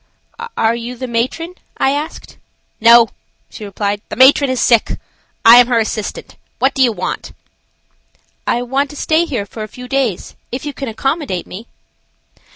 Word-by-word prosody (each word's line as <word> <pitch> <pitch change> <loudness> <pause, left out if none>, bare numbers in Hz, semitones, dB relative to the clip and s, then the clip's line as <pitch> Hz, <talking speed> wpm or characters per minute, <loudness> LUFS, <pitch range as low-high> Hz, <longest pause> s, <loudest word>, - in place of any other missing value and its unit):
"Are 225 0 +2
you 235 +1 -5
the 255 - -5
matron?" 255 +9 -2 0.2
I 270 - +2
asked. 295 +3 -5 0.4
"No," 230 0 +7 0.4
she 220 - -10
replied, 205 0 -3
"the - - -5
matron 265 +3 +6
is 255 -1 -1
sick; 230 -2 +2 0.5
I 230 +1 +10
am 245 -1 +7
her 245 -2 +1
assistant. 220 -1 -3 0.2
What 265 +1 +2
do 270 - -1
you 250 -2 +5
want?" 215 - -5 1.1
"I 240 - +1
want 270 +3 -1
to 295 - -11
stay 315 +3 +1
here 240 -11 -3
for 215 +2 -9
a 215 - -4
few 250 +4 -11
days, 250 -8 -2 0.2
if 255 +3 -5
you 290 - -4
can 275 - -6
accommodate 260 - -2
me." 215 +6 -10
245 Hz, 165 wpm, -16 LUFS, 225-270 Hz, 1.1 s, I